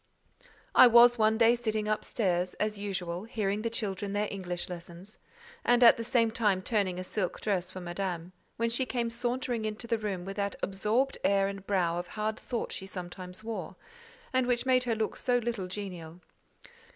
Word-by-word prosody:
I 255 Hz, -, +9 dB
was 240 Hz, 0 st, +7 dB
one 220 Hz, 0 st, +4 dB
day 230 Hz, 0 st, +6 dB
sitting 220 Hz, -3 st, -1 dB
up 215 Hz, 0 st, 0 dB
stairs, 180 Hz, -4 st, 0 dB
as 210 Hz, -1 st, -2 dB
usual, 185 Hz, -2 st, -4 dB
hearing 210 Hz, -3 st, -1 dB
the 230 Hz, -, -1 dB
children 200 Hz, -3 st, -3 dB
their 205 Hz, +1 st, 0 dB
English 180 Hz, -3 st, -3 dB
lessons, 175 Hz, +3 st, -9 dB, 0.4 s
and 245 Hz, 0 st, +4 dB
at 230 Hz, -, +9 dB
the 230 Hz, -, -4 dB
same 230 Hz, -1 st, +2 dB
time 205 Hz, -5 st, +1 dB
turning 195 Hz, -4 st, 0 dB
a 185 Hz, -, -3 dB
silk 185 Hz, 0 st, -2 dB
dress 185 Hz, -4 st, -1 dB
for 185 Hz, -, -8 dB
Madame, 175 Hz, -1 st, -4 dB, 0.3 s
when 230 Hz, 0 st, 0 dB
she 255 Hz, +2 st, 0 dB
came 235 Hz, -2 st, -1 dB
sauntering 245 Hz, 0 st, -2 dB
into 215 Hz, +2 st, -4 dB
the 230 Hz, -1 st, 0 dB
room 195 Hz, -4 st, -3 dB
with 195 Hz, +1 st, -6 dB
that 200 Hz, -1 st, -1 dB
absorbed 215 Hz, +8 st, 0 dB
air 195 Hz, -1 st, +3 dB
and 195 Hz, -1 st, -7 dB
brow 175 Hz, -4 st, +1 dB
of 175 Hz, -, -5 dB
hard 215 Hz, +1 st, -1 dB
thought 240 Hz, -, -4 dB
she 190 Hz, -, -6 dB
sometimes 180 Hz, +1 st, -8 dB
wore, 225 Hz, 0 st, -5 dB, 0.6 s
and 255 Hz, -1 st, +2 dB
which 245 Hz, 0 st, +1 dB
made 255 Hz, -1 st, +3 dB
her 235 Hz, -2 st, +1 dB
look 220 Hz, 0 st, -2 dB
so 245 Hz, -1 st, +1 dB
little 230 Hz, -5 st, -2 dB
genial. 180 Hz, -4 st, -7 dB
210 Hz, 190 wpm, -30 LUFS, 185-230 Hz, 0.6 s, I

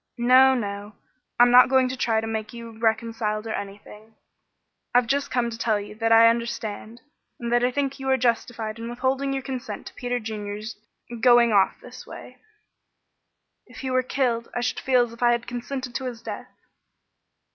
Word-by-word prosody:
"No, 255 Hz, +2 st, +6 dB
no. 205 Hz, -2 st, -5 dB, 0.4 s
I'm 245 Hz, 0 st, +7 dB
not 250 Hz, +1 st, +8 dB
going 260 Hz, -1 st, +4 dB
to 255 Hz, -, -4 dB
try 225 Hz, -3 st, +1 dB
to -, -, -5 dB
make 220 Hz, +1 st, -4 dB
you 230 Hz, -1 st, -9 dB
reconciled, 220 Hz, -1 st, -1 dB
or 220 Hz, -, -3 dB
anything. 210 Hz, +2 st, -9 dB, 0.8 s
I've 245 Hz, 0 st, +5 dB
just 275 Hz, +4 st, -1 dB
come 240 Hz, -2 st, 0 dB
to 225 Hz, -, -7 dB
tell 220 Hz, -3 st, +1 dB
you 205 Hz, +1 st, -8 dB
that 225 Hz, +1 st, -1 dB
I 225 Hz, 0 st, +8 dB
understand, 230 Hz, -1 st, -3 dB, 0.4 s
and 235 Hz, -1 st, -4 dB
that 240 Hz, 0 st, +3 dB
I 250 Hz, -, +3 dB
think 275 Hz, +1 st, -2 dB
you 265 Hz, 0 st, -3 dB
are 265 Hz, -, +4 dB
justified 230 Hz, -2 st, -1 dB
in 230 Hz, +1 st, -5 dB
withholding 260 Hz, +3 st, -1 dB
your 270 Hz, -1 st, -3 dB
consent 260 Hz, -2 st, -6 dB
to -, -, -10 dB
Peter 245 Hz, 0 st, -3 dB
Junior's 215 Hz, -1 st, -6 dB, 0.5 s
going 240 Hz, -2 st, +5 dB
off 195 Hz, -2 st, +3 dB
in -, -, -14 dB
this 250 Hz, +1 st, -12 dB
way." 255 Hz, -, -11 dB, 1.3 s
"If 235 Hz, -3 st, -11 dB
he 260 Hz, -1 st, -3 dB
were 255 Hz, 0 st, +3 dB
killed, 245 Hz, -3 st, -1 dB
I 245 Hz, -, -1 dB
should 245 Hz, -, -1 dB
feel 255 Hz, -2 st, +3 dB
as 230 Hz, -, -12 dB
if 235 Hz, -, -14 dB
I 240 Hz, 0 st, +4 dB
had 235 Hz, 0 st, -2 dB
consented 245 Hz, +1 st, -5 dB
to 265 Hz, -, -4 dB
his 240 Hz, -3 st, -6 dB
death." -, -, -7 dB
235 Hz, 190 wpm, -24 LUFS, 225-255 Hz, 1.3 s, not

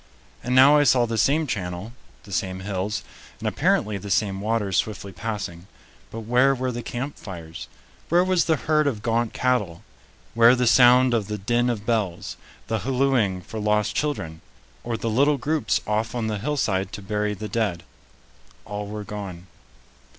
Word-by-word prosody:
And 125 Hz, +1 st, -1 dB
now 135 Hz, +3 st, +8 dB
I 145 Hz, -, +5 dB
saw 125 Hz, -3 st, +4 dB
the 115 Hz, 0 st, -3 dB
same 140 Hz, +8 st, +2 dB
channel, 95 Hz, -2 st, -4 dB, 0.3 s
the 100 Hz, -, -14 dB
same 95 Hz, -1 st, -2 dB
hills, 100 Hz, +2 st, -3 dB, 0.3 s
and -, -, -4 dB
apparently 105 Hz, -1 st, +1 dB
the 100 Hz, +2 st, -8 dB
same 100 Hz, -3 st, 0 dB
waters 105 Hz, -3 st, -1 dB
swiftly 100 Hz, -2 st, -2 dB
passing. 95 Hz, -3 st, -5 dB, 0.4 s
But 115 Hz, -, -7 dB
where 125 Hz, +5 st, +3 dB
were 130 Hz, 0 st, -2 dB
the 120 Hz, 0 st, -5 dB
camp 125 Hz, +5 st, -5 dB
fires? 85 Hz, -5 st, -8 dB, 0.4 s
Where 175 Hz, +2 st, +4 dB
was 185 Hz, -2 st, +2 dB
the 160 Hz, -, +3 dB
herd 155 Hz, 0 st, +1 dB
of 110 Hz, -7 st, -2 dB
gaunt 115 Hz, 0 st, 0 dB
cattle? 105 Hz, -10 st, 0 dB, 0.5 s
Where 115 Hz, +2 st, +6 dB
the 125 Hz, 0 st, +1 dB
sound 125 Hz, +1 st, +6 dB
of 110 Hz, -4 st, 0 dB
the 105 Hz, 0 st, -3 dB
din 120 Hz, +5 st, +1 dB
of 110 Hz, -3 st, -3 dB
bells? 105 Hz, -7 st, -1 dB, 0.3 s
The 110 Hz, -1 st, -1 dB
hallooing 125 Hz, -8 st, +1 dB
for 110 Hz, -, -7 dB
lost 105 Hz, 0 st, +1 dB
children? 80 Hz, -, -2 dB, 0.4 s
Or 120 Hz, -1 st, -3 dB
the 115 Hz, -, -4 dB
little 140 Hz, +6 st, +3 dB
groups 145 Hz, -3 st, 0 dB
off 110 Hz, +3 st, -1 dB
on 120 Hz, -2 st, -1 dB
the 105 Hz, -2 st, -2 dB
hillside 105 Hz, -7 st, -1 dB
to 100 Hz, -, -7 dB
bury 105 Hz, +1 st, -1 dB
the 105 Hz, +2 st, -6 dB
dead? 100 Hz, -5 st, -1 dB, 0.8 s
All 105 Hz, 0 st, -5 dB
were 105 Hz, 0 st, -6 dB
gone. 100 Hz, -4 st, -7 dB
110 Hz, 170 wpm, -24 LUFS, 100-125 Hz, 0.8 s, now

